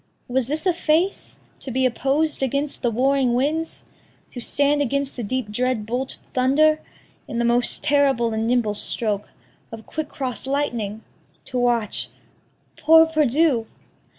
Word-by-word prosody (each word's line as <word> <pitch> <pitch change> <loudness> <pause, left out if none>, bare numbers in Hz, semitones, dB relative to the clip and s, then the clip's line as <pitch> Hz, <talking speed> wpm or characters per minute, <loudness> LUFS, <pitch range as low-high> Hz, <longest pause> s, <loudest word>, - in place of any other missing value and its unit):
Was 250 -1 0
this 305 +5 -2
a 365 - +3
face 335 +3 0 0.2
To - - -8
be 260 +1 +1
oppos'd 275 +5 0
against 280 +2 -1
the 240 - +1
warring 255 +1 +2
winds? 310 +6 -1 0.5
To 245 - -7
stand 285 +4 +1
against 280 +1 -1
the 245 - -5
deep 235 0 -3
dread 245 -1 -1
bolted 250 +4 -3 0.2
thunder? 300 +5 +3 0.5
In 235 - -5
the 235 - +1
most 240 +1 +2
terrible 270 -5 +2
and 220 +1 -1
nimble 235 -3 +1
stroke 210 -1 -3 0.4
Of 225 -1 -9
quick 315 -1 -5
cross 260 -3 -5
lightning? 235 -7 -2 0.4
to 250 - -3
watch 240 -4 0 0.7
poor 320 +1 +7
perdu! 300 -5 +2
260 Hz, 145 wpm, -22 LUFS, 235-290 Hz, 0.7 s, poor